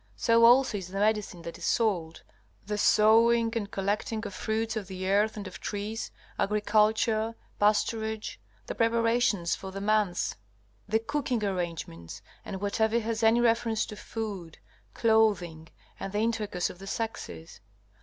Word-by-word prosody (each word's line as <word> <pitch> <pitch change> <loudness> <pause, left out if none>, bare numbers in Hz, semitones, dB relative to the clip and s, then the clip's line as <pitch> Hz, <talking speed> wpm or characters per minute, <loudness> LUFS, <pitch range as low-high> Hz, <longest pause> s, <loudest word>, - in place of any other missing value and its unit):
So 230 - +4
also 245 -3 +5
is 185 - -8
the 190 +2 -7
medicine 205 -4 0
that 170 - -8
is - - -5
sold, 180 -8 0 0.4
the 210 +1 -2
sowing 225 +2 +4
and 205 -3 -2
collecting 210 +3 -2
of 200 - -6
fruits 220 +2 -2
of 210 -4 -4
the 190 -1 -5
earth 210 +3 +2
and 205 - -5
of 175 -2 -9
trees, 210 +3 -4 0.3
agriculture, 215 +2 +2 0.2
pasturage, 220 +1 0 0.3
the - - -4
preparations 230 -6 +2
for 190 - -8
the 195 - -6
months, 205 - 0 0.5
the 220 - +3
cooking 245 -1 -2
arrangements, 170 - -4 0.2
and 190 - -6
whatever 220 +3 +1
has 225 0 -3
any 225 +2 +4
reference 230 -1 +2
to 215 - -8
food, 205 -7 -6 0.4
clothing, 205 -8 +2 0.3
and 195 - -5
the 205 - 0
intercourse 215 -5 -1
of 180 - -15
the 195 - -10
sexes. 220 -6 -5
215 Hz, 145 wpm, -28 LUFS, 195-225 Hz, 0.5 s, also